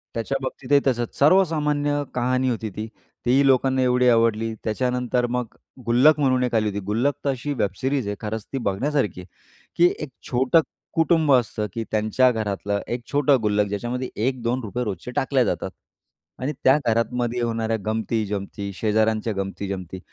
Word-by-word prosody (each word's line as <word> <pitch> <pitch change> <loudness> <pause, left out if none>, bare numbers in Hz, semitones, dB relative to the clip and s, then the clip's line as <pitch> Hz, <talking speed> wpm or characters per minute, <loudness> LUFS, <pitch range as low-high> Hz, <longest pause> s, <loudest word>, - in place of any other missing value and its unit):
त्याच्याबाबतीतही 135 +3 0
तसंच. 120 -2 -1
सर्वसामान्य 150 -3 +3
कहाणी 130 +1 +1
होती 115 -2 -2
ती, 105 +3 -6 0.4
तीही 130 +3 +4
लोकांना 130 0 +3
एवढी 125 0 +3
आवडली. 115 -1 +2
त्याच्यानंतर 125 +2 0
मग 125 -2 -3 0.3
गुल्लक 130 +6 +5
म्हणून 130 -3 +2
एक 125 -2 -1
आली 110 -1 +2
होती. 100 0 -3
गुल्लक 115 +8 +1
तर - - +2
अशी 135 +2 -2
वेब 105 -7 0
सिरीज 135 -3 0
आहे, 105 - -2
खरंच 110 0 -4
ती - - 0
बघण्यासारखी 105 - -1
आहे, 90 - -13 0.5
की 175 +1 +5
एक 150 - -6 0.2
छोटं 130 +6 +4 0.3
कुटुंब 160 -2 +3
असतं, 110 -4 +1
की 115 - -3
त्यांच्या 110 +4 +3
घरातलं 100 -2 -2
एक 120 0 -4
छोटं 145 -1 +4
गुल्लक, 105 -1 +1
ज्याच्यामध्ये 120 +5 -3 0.2
₹1-2 125 -2 -2
रोजचे 105 +1 -5
टाकल्या 135 -1 +2
जातात - - -2 0.7
आणि 140 +4 -2
त्या 130 +2 +6
घरामध्ये 120 +1 0
होणाऱ्या 115 -1 -1
गमती, 110 0 -1
जमती, 100 0 -4
शेजाऱ्यांच्या 110 +2 +1
गमती-जमती, 95 -2 -4
120 Hz, 150 wpm, -23 LUFS, 110-130 Hz, 0.7 s, त्या